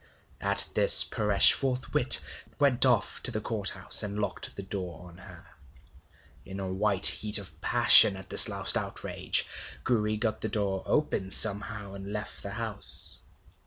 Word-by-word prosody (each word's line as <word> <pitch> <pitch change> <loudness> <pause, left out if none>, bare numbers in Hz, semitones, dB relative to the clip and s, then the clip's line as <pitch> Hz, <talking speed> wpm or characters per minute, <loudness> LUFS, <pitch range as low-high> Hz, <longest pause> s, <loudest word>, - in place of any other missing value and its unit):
At - - 0
this - - +6
Paresh 105 -2 +1
forthwith 130 -2 +2 0.4
went 135 -2 0
off 120 -2 -3
to - - -1
the 110 - -7
Court 105 -2 -5
house, - - -2
and 105 0 -8
locked 105 - -8
the 100 - -11
door 90 -2 -11
on 85 +1 -20
her. 90 -3 -17 1.0
In 95 0 -12
a 95 -1 -8
white 100 0 -1
heat 105 0 +8
of 100 -2 -7
passion 95 - +5
at 95 - -15
this - - +3
last - - 0
outrage, - - -4 0.4
Gouri 110 -2 -4
got 110 0 -6
the 110 - -6
door 100 -2 -6
open 120 -10 -4
somehow, 100 0 +1
and 100 0 -12
left 105 0 -9
the - - -10
house. - - -3
105 Hz, 160 wpm, -24 LUFS, 95-110 Hz, 1.0 s, heat